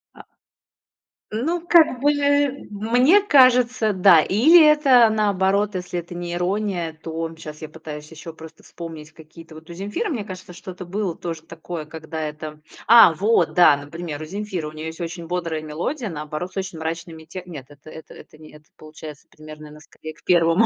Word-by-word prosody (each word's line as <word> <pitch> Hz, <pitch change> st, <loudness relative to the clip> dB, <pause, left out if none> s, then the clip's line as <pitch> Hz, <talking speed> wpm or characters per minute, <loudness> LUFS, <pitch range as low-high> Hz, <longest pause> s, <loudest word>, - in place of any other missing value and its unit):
А -, -, -13 dB, 1.1 s
Ну, 320 Hz, +11 st, -2 dB
как 320 Hz, -8 st, +5 dB
бы, 290 Hz, +1 st, +4 dB, 0.6 s
мне 245 Hz, -, +3 dB
кажется, 250 Hz, -, +4 dB
да. 185 Hz, -3 st, +6 dB
Или 310 Hz, -, +5 dB
это 270 Hz, -6 st, +5 dB
наоборот, 200 Hz, -1 st, +1 dB
если 180 Hz, -1 st, -4 dB
это 175 Hz, +1 st, -10 dB
не 175 Hz, 0 st, -5 dB
ирония, 180 Hz, -2 st, -2 dB
то, 165 Hz, 0 st, -5 dB
щас 155 Hz, 0 st, -10 dB
я 155 Hz, -, -7 dB
пытаюсь 155 Hz, -1 st, -10 dB
ещё 160 Hz, +1 st, -10 dB
просто 160 Hz, 0 st, -14 dB
вспомнить 160 Hz, -2 st, -10 dB
какие-то 160 Hz, 0 st, -15 dB
Вот 160 Hz, +1 st, -14 dB
у -, -, -8 dB
"Земфиры", 205 Hz, -, -4 dB
мне 235 Hz, -9 st, -3 dB
кажется, 185 Hz, -2 st, -10 dB
что-то 180 Hz, 0 st, -9 dB
было 190 Hz, -1 st, -3 dB
тоже 165 Hz, -2 st, -6 dB
такое, 165 Hz, -1 st, -8 dB
когда 160 Hz, +1 st, -8 dB
это 155 Hz, 0 st, -6 dB, 0.3 s
А, 230 Hz, -8 st, +8 dB
вот, 210 Hz, +8 st, +1 dB
да, 155 Hz, -5 st, +6 dB
например, 150 Hz, +1 st, -7 dB
у -, -, -6 dB
"Земфиры", 190 Hz, -3 st, -5 dB
у -, -, -8 dB
неё 155 Hz, +1 st, -7 dB
есть 165 Hz, +2 st, -8 dB
очень 170 Hz, 0 st, -6 dB
бодрая 165 Hz, -3 st, -3 dB
мелодия, 190 Hz, -, -4 dB
наоборот 150 Hz, +3 st, -6 dB
с -, -, -11 dB
очень 190 Hz, -4 st, -5 dB
мрачными 160 Hz, 0 st, -6 dB
тек 180 Hz, +2 st, -9 dB
Нет, 145 Hz, -7 st, -9 dB
это 145 Hz, +2 st, -15 dB
это 160 Hz, -, -12 dB
это 155 Hz, -, -16 dB
не 155 Hz, -, -14 dB
это 150 Hz, 0 st, -17 dB
получается 155 Hz, -1 st, -12 dB
примерно 155 Hz, 0 st, -12 dB
она 150 Hz, 0 st, -14 dB
скорее 155 Hz, 0 st, -11 dB
к -, -, -25 dB
первому 175 Hz, +4 st, +3 dB
170 Hz, 180 wpm, -22 LUFS, 155-205 Hz, 1.1 s, А